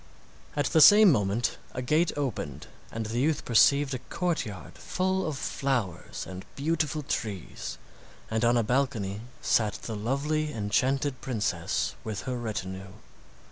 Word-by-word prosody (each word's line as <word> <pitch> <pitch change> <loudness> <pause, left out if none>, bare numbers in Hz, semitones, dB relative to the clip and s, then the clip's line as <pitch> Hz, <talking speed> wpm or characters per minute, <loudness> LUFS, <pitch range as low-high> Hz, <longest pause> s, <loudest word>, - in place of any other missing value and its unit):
At 145 0 +1
the 160 - +4
same 205 +2 +9
moment 105 -1 0 0.2
a 125 - -2
gate 155 +7 +2
opened, 80 - -3 0.3
and 115 0 -4
the 115 +3 -2
youth 150 +3 +1
perceived 140 +4 +4
a 130 - -2
courtyard 115 - -3
full 190 0 -1
of 150 -3 -3
flowers 125 -12 -2
and 95 0 -8
beautiful 155 0 -1
trees, 100 - -4 0.5
and 110 +1 -1
on 120 +1 +4
a 115 - +3
balcony 110 -5 0 0.2
sat 110 -3 +2
the 110 - -4
lovely 145 +8 -1
enchanted 130 +6 0
princess 105 -9 -1
with 105 -3 -4
her 130 - -3
retinue. 95 -5 -5
125 Hz, 140 wpm, -28 LUFS, 105-145 Hz, 0.5 s, same